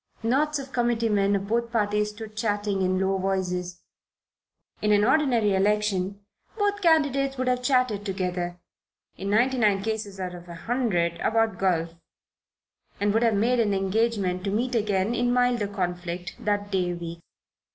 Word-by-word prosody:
Knots 295 Hz, +6 st, +1 dB
of 275 Hz, -1 st, -8 dB
committee 235 Hz, -2 st, +1 dB
men 200 Hz, -1 st, +2 dB
of 195 Hz, 0 st, -2 dB
both 235 Hz, +2 st, 0 dB
parties 210 Hz, -2 st, +1 dB
stood 215 Hz, 0 st, -9 dB
chatting 205 Hz, -2 st, -1 dB
in 185 Hz, 0 st, +1 dB
low 190 Hz, 0 st, +1 dB
voices. 180 Hz, -2 st, -2 dB, 1.0 s
In 210 Hz, -, +2 dB
an 205 Hz, 0 st, +4 dB
ordinary 245 Hz, -5 st, +3 dB
election 200 Hz, -1 st, 0 dB, 0.4 s
both 410 Hz, -1 st, 0 dB
candidates 280 Hz, -5 st, +2 dB
would 255 Hz, 0 st, -1 dB
have 250 Hz, 0 st, +1 dB
chatted 250 Hz, -6 st, +1 dB
together, 180 Hz, -3 st, -3 dB, 0.6 s
in 195 Hz, +2 st, -5 dB
ninety 245 Hz, +5 st, +2 dB
nine 205 Hz, -3 st, +2 dB
cases 215 Hz, -3 st, -4 dB
out 180 Hz, -1 st, -4 dB
of 175 Hz, 0 st, -11 dB
a 170 Hz, -, -7 dB
hundred 175 Hz, -6 st, -1 dB
about 225 Hz, -4 st, +1 dB
golf, 170 Hz, -3 st, +1 dB, 1.1 s
and 205 Hz, 0 st, +1 dB
would 225 Hz, -, +2 dB
have 230 Hz, -3 st, +3 dB
made 240 Hz, +5 st, +2 dB
an 210 Hz, -3 st, +2 dB
engagement 195 Hz, -2 st, 0 dB
to 200 Hz, -, -1 dB
meet 240 Hz, +5 st, -1 dB
again 205 Hz, -1 st, +1 dB
in 245 Hz, 0 st, +1 dB
milder 245 Hz, -3 st, +2 dB
conflict 180 Hz, -2 st, -4 dB
that 205 Hz, -1 st, -1 dB
day 180 Hz, -2 st, 0 dB
week. 170 Hz, -1 st, -7 dB
210 Hz, 160 wpm, -26 LUFS, 190-235 Hz, 1.1 s, an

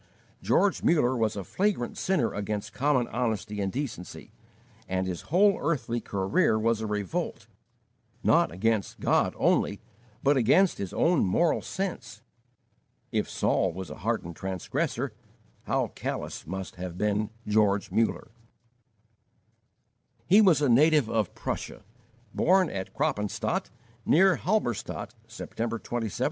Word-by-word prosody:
George 200 Hz, -1 st, +2 dB
Muller 140 Hz, -6 st, +3 dB
was 110 Hz, -3 st, 0 dB
a 100 Hz, -, -4 dB
flagrant 185 Hz, -, -1 dB
sinner 185 Hz, -12 st, 0 dB
against 105 Hz, +1 st, -4 dB
common 135 Hz, -3 st, +1 dB
honesty 110 Hz, -3 st, -2 dB
and 95 Hz, -1 st, -1 dB
decency, 125 Hz, -9 st, -6 dB, 0.6 s
and 95 Hz, 0 st, 0 dB
his 90 Hz, -2 st, -5 dB
whole 195 Hz, +5 st, +4 dB
early 125 Hz, -6 st, -1 dB
career 100 Hz, +2 st, +1 dB
was 110 Hz, 0 st, +1 dB
a 110 Hz, -, -2 dB
revolt, 105 Hz, -4 st, -3 dB, 0.8 s
not -, -, +4 dB
against 105 Hz, +3 st, -1 dB
God -, -, +2 dB
only, 100 Hz, -, +2 dB, 0.4 s
but 140 Hz, +1 st, +4 dB
against 165 Hz, -, +4 dB
his 95 Hz, -3 st, -4 dB
own 170 Hz, -2 st, +2 dB
moral 155 Hz, -, +2 dB
sense. 180 Hz, -, -5 dB, 0.9 s
If -, -, -1 dB
Saul 95 Hz, -3 st, +1 dB
was 95 Hz, -1 st, -7 dB
a -, -, -8 dB
hardened 85 Hz, 0 st, -2 dB
transgressor, 95 Hz, 0 st, -3 dB, 0.5 s
how -, -, 0 dB
callous -, -, -5 dB
must 95 Hz, +2 st, -6 dB
have 90 Hz, -1 st, -6 dB
been 105 Hz, +1 st, 0 dB, 0.2 s
George 105 Hz, -2 st, +2 dB
Muller! 110 Hz, +2 st, 0 dB, 1.9 s
He 200 Hz, +4 st, +6 dB
was 170 Hz, -8 st, +4 dB
a -, -, +4 dB
native 145 Hz, +1 st, +4 dB
of 110 Hz, -5 st, -1 dB
Prussia, -, -, -5 dB, 0.5 s
born 185 Hz, 0 st, +3 dB
at 95 Hz, -1 st, -5 dB
Kroppenstaedt, 105 Hz, -1 st, -1 dB, 0.3 s
near 190 Hz, +3 st, +4 dB
Halberstadt, 120 Hz, -, -2 dB
September 115 Hz, +1 st, -4 dB
27, 115 Hz, +3 st, -7 dB
1805. 105 Hz, -, -7 dB
110 Hz, 130 wpm, -27 LUFS, 100-150 Hz, 1.9 s, He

